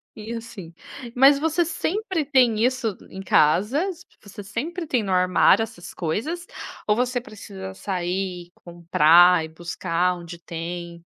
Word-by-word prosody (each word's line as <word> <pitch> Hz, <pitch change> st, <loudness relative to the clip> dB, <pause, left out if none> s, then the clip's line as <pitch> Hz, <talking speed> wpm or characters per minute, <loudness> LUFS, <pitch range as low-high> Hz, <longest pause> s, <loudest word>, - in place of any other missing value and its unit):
E 220 Hz, +1 st, -8 dB
assim, 225 Hz, -7 st, -8 dB, 0.4 s
mas 275 Hz, +2 st, +6 dB
você 320 Hz, +2 st, +1 dB
sempre 360 Hz, +1 st, -2 dB
tem 255 Hz, -6 st, +3 dB
isso 250 Hz, -5 st, 0 dB
em 190 Hz, -, -9 dB
casas? 245 Hz, -, +2 dB, 0.2 s
Você 205 Hz, 0 st, -11 dB
sempre 320 Hz, -, -4 dB
tem 250 Hz, -6 st, 0 dB
no 195 Hz, -2 st, -4 dB
armário 185 Hz, +3 st, +4 dB
essas 215 Hz, -6 st, -9 dB
coisas? 275 Hz, -, -3 dB, 0.4 s
Ou 210 Hz, -, +3 dB
você 250 Hz, +1 st, 0 dB
precisa 200 Hz, -5 st, -9 dB
sair 185 Hz, -1 st, -3 dB
e -, -, -44 dB
comprar 170 Hz, 0 st, +4 dB
e -, -, -6 dB
buscar 175 Hz, +2 st, -1 dB
onde 170 Hz, 0 st, -9 dB
tem? 170 Hz, 0 st, -7 dB
200 Hz, 140 wpm, -23 LUFS, 175-255 Hz, 0.4 s, mas